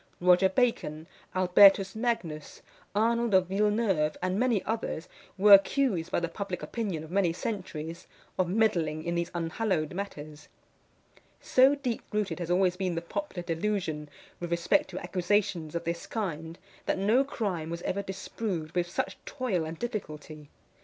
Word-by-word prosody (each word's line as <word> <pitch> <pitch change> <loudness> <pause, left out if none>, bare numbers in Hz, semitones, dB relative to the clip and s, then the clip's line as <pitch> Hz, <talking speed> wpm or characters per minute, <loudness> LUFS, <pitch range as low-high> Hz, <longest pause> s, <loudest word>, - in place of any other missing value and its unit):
Roger 180 +1 +5
Bacon, 185 -8 0 0.3
Albertus 195 +1 +6
Magnus, 205 -10 -3 0.3
Arnold 230 0 +2
of 185 -1 +5
Villeneuve, 195 -5 +1
and 185 +2 -1
many 240 -5 +2
others, 220 -6 -3 0.3
were 200 +2 +7
accused 195 -4 +4
by - - +2
the 170 - -1
public 185 +1 -5
opinion 195 -9 -3
of 160 - -11
many 190 -3 +2
centuries, 170 -4 -5 0.3
of 180 -2 +2
meddling 170 -7 +1
in 170 +1 -2
these 170 0 -1
unhallowed 170 -1 -1
matters. 155 -6 -7 0.9
So 265 +2 +5
deep 255 -5 -3
rooted 210 -3 -1
has 175 -1 -4
always 180 0 +3
been 185 -3 -1
the 165 - -2
popular 190 - -4
delusion 165 -3 -2 0.3
with 175 - -4
respect 170 +2 +2
to 185 - -7
accusations 180 -2 0
of 170 - -2
this 170 0 -4
kind, 165 -6 -4 0.3
that - - +1
no 215 +8 +3
crime 195 - -3
was 170 0 -5
ever 200 - -1
disproved 190 -3 -4
with 175 -1 0
such - - -3
toil 215 - -1
and 160 +1 -6
difficulty. 155 - -6
185 Hz, 150 wpm, -29 LUFS, 165-210 Hz, 0.9 s, were